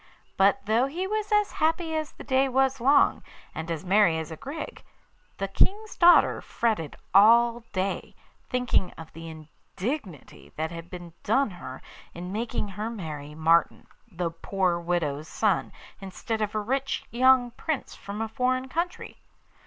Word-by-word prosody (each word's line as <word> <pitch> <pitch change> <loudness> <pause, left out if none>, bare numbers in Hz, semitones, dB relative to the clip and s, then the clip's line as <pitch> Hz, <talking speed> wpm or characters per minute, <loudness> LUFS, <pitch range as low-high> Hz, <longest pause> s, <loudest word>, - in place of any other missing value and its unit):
But 200 +7 +3
though 225 +5 +2
he 345 +7 -3
was 425 +1 -2
as 420 -1 +3
happy 320 +1 0
as 310 -1 -2
the - - -11
day 265 0 +2
was 265 0 +1
long, 280 +4 +4 0.3
and 160 +1 -6
as 165 +1 -4
merry 185 -3 +4
as 160 0 -5
a - - -5
grig, 290 - -7 0.5
the 195 - -2
King's 415 - +1
daughter 350 0 +6
fretted 210 -11 -1 0.2
all 235 +4 +6
day, 190 +1 -3 0.3
thinking 250 -7 +1
of 160 -1 -11
the 165 +1 -8
indignity 175 - -7
that 160 +1 -3
had 165 0 -8
been 175 -2 -9
done 245 +2 +2
her 145 -7 -9 0.3
in 180 +2 -6
making 220 0 -3
her 210 +3 -4
marry 150 -9 -7
Martin, 165 +2 +2 0.3
the 175 -2 -2
poor 180 +1 -1
widow's 165 -4 -2
son, 210 +1 0 0.3
instead 200 +3 -4
of 210 0 -2
a - - +2
rich 265 +6 -1
young 250 0 +4
Prince 280 +3 -4
from 205 +2 -7
a - - -3
foreign 255 +3 -1
country. 345 +5 -4
215 Hz, 155 wpm, -27 LUFS, 170-265 Hz, 0.5 s, daughter